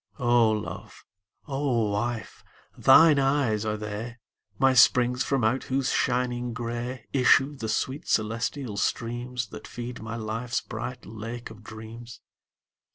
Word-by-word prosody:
O 120 -4 +4
Love, 110 -1 -5 0.4
O 135 -7 0
Wife, 115 +2 -3 0.3
thine 150 +2 +7
eyes 135 -6 +1
are 110 0 -1
they, 105 +3 -6 0.4
My 135 -1 +4
springs 125 0 +5
from 135 -4 0
out 120 +5 +1
whose 135 0 0
shining 125 -1 0
gray 120 +2 -4
Issue 135 +2 +4
the 115 -5 -5
sweet 135 +7 -2
celestial 115 +1 -1
streams 120 +1 -2
That 110 0 -9
feed 120 -1 -7
my 110 +1 -5
life's 115 +2 -2
bright 120 +2 -6
Lake 115 +2 -7
of 110 0 -13
Dreams. 110 +2 -10
120 Hz, 130 wpm, -26 LUFS, 110-125 Hz, 0.4 s, thine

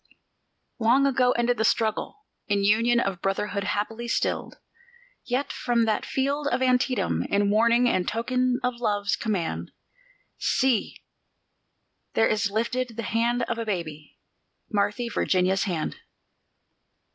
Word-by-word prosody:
Long 240 +5 +4
ago 250 -2 +3
ended 240 +1 +1
the 220 - +1
struggle, 225 - 0 0.2
in 200 -1 +1
union 230 +4 +3
of 195 -5 -2
brotherhood 200 +1 -1
happily 220 +4 -2
stilled; - - -1 0.7
Yet 260 +3 -1
from 235 -2 +1
that 215 -1 -1
field 280 +2 -1
of 260 - 0
Antietam, 250 -5 +1
in 200 0 +2
warning 235 +3 +4
and 185 -6 +1
token 250 +2 0
of 250 -1 -2
love's 205 -3 0
command, 170 - -2 0.7
See! 260 -4 0 1.1
there 225 - +4
is 210 -1 +1
lifted 235 +2 -2
the 230 - -3
hand 235 +3 0
of 235 0 -3
a 230 - -3
baby 155 -6 -5 0.5
Marthy 210 +3 0
Virginia's 190 -3 +1
hand! 170 -6 -3
230 Hz, 125 wpm, -25 LUFS, 205-245 Hz, 1.1 s, Long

